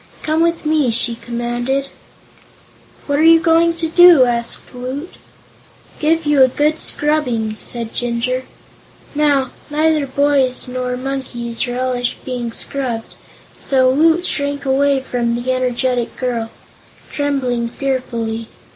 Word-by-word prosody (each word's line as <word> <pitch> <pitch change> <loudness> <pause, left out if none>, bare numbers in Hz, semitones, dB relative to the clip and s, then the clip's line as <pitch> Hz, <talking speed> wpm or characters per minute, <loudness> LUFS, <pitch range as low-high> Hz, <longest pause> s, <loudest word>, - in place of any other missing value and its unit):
Come 310 +1 +1
with 335 -1 0
me!" 300 -4 +2
she 235 +1 -1
commanded. 240 +3 -3 1.2
"What 285 0 0
are - - +3
you 330 0 +7
going 330 +1 +3
to 330 -1 -2
do?" 340 -4 +7
asked 235 0 -2
Woot. 260 +7 -6 0.9
"Give 320 +1 +1
you 295 -2 +3
a 260 - +8
good 300 +4 0
scrubbing," 250 -8 +1
said 230 -2 -6
Jinjur. 245 +2 -2 0.7
Now, 285 -3 +1 0.2
neither 305 -1 +1
boys 270 -2 +1
nor 250 0 -3
monkeys 250 -2 -2
relish 245 0 -2
being 245 -2 -4
scrubbed, 240 -2 -3 0.5
so 260 -1 +3
Woot 325 +5 +3
shrank 285 -2 -1
away 275 0 +2
from 240 -2 -1
the 240 +2 -2
energetic 250 -1 -1
girl, 235 -3 -2 0.6
trembling 255 -5 -1
fearfully. 235 -4 -3
260 Hz, 120 wpm, -18 LUFS, 245-295 Hz, 1.2 s, a